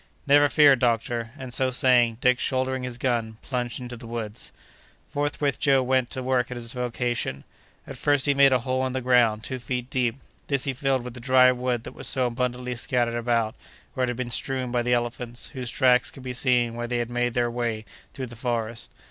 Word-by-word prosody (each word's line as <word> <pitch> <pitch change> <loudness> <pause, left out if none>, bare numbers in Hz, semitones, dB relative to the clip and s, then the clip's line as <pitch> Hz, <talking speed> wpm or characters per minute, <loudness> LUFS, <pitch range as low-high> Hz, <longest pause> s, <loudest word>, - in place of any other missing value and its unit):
"Never 145 +1 +5
fear, 145 -3 +6
doctor!" 115 -1 0
and, 130 -3 -6
so 130 +1 +2
saying, 125 -3 +3
Dick, 125 0 +3
shouldering 130 0 -1
his 125 -2 -4
gun, 115 -3 -1
plunged 125 -2 -3
into 125 -1 -7
the 115 0 -11
woods. 115 -2 -5 0.6
Forthwith 145 -1 -1
Joe 135 -2 +3
went 130 -1 +1
to 130 - -5
work 125 -2 +1
at 125 - -5
his 115 -1 -5
vocation. 120 - -2 0.4
At - - -8
first 145 -2 +2
he 145 - +4
made 140 -1 +6
a 130 -2 +3
hole 130 +1 -1
in 130 - -5
the 130 - -2
ground 120 -3 +3
two 130 +1 -4
feet 125 +2 -4
deep; 125 -5 +1 0.3
this 140 -2 0
he 135 - -1
filled 135 -1 0
with 125 -1 -7
the 125 - -9
dry 130 +1 +5
wood 125 -2 -2
that - - -9
was - - -5
so 130 -2 +1
abundantly 125 +1 -2
scattered 120 -1 0
about, 115 -2 0 0.4
where 130 - 0
it - - -3
had 120 - -3
been 125 -1 -3
strewn 130 0 -2
by 120 -1 +1
the 125 +1 -1
elephants, 120 0 -2
whose 125 -2 -4
tracks 125 0 +3
could 135 - -13
be 125 -1 -4
seen 125 -2 +2
where 120 0 -4
they 120 0 -1
had 120 0 -2
made 120 -1 -1
their 120 -1 +1
way 115 -2 -2 0.3
through 130 - -4
the 120 -1 -10
forest. 115 -1 -3
125 Hz, 215 wpm, -25 LUFS, 120-130 Hz, 0.6 s, fear